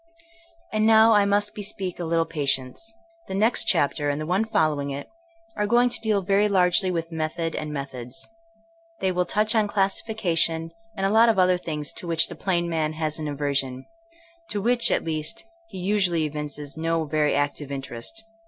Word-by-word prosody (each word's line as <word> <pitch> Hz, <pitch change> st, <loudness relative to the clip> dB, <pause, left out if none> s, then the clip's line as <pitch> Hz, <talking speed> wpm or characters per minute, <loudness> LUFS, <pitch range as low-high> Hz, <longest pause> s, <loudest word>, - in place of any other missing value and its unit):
And 215 Hz, 0 st, +2 dB
now 225 Hz, 0 st, +7 dB
I 205 Hz, -1 st, +5 dB
must 205 Hz, +1 st, +1 dB
bespeak 195 Hz, -3 st, -4 dB
a 175 Hz, -, -3 dB
little 165 Hz, 0 st, +1 dB
patience. 140 Hz, -, -2 dB, 0.4 s
The 190 Hz, -, -4 dB
next 220 Hz, +5 st, +3 dB
chapter, 145 Hz, +1 st, +1 dB
and 145 Hz, +1 st, -1 dB
the 155 Hz, -, -3 dB
one 185 Hz, +6 st, +1 dB
following 155 Hz, -9 st, +1 dB
it, 140 Hz, +1 st, -5 dB, 0.5 s
are 210 Hz, -, 0 dB
going 240 Hz, +3 st, +4 dB
to 245 Hz, -, +1 dB
deal 210 Hz, -3 st, +1 dB
very 200 Hz, +2 st, +3 dB
largely 185 Hz, -1 st, +3 dB
with 165 Hz, -1 st, -3 dB
method 165 Hz, +1 st, -2 dB
and 155 Hz, 0 st, -4 dB
methods. 135 Hz, 0 st, -6 dB, 0.7 s
They 190 Hz, -, +1 dB
will 180 Hz, 0 st, 0 dB
touch 215 Hz, +1 st, +2 dB
on 215 Hz, -2 st, +3 dB
classification, 190 Hz, -5 st, 0 dB, 0.3 s
and 195 Hz, -, 0 dB
a 195 Hz, -, +2 dB
lot 225 Hz, +2 st, +6 dB
of 220 Hz, -, +2 dB
other 180 Hz, -1 st, +4 dB
things 150 Hz, -4 st, -4 dB
to 175 Hz, -, -8 dB
which 165 Hz, -1 st, +2 dB
the -, -, -7 dB
plain 175 Hz, -3 st, 0 dB
man 160 Hz, -2 st, -1 dB
has 155 Hz, 0 st, -2 dB
an 155 Hz, -, -3 dB
aversion; 140 Hz, -3 st, -2 dB, 0.6 s
to 210 Hz, -, -2 dB
which, 235 Hz, +3 st, +2 dB
at -, -, +1 dB
least, 160 Hz, +5 st, -3 dB, 0.3 s
he -, -, -9 dB
usually 185 Hz, -3 st, +1 dB
evinces 150 Hz, -1 st, -5 dB
no 165 Hz, 0 st, -1 dB
very 150 Hz, 0 st, +1 dB
active 145 Hz, 0 st, -1 dB
interest. 135 Hz, -, -6 dB
170 Hz, 180 wpm, -25 LUFS, 150-205 Hz, 0.7 s, now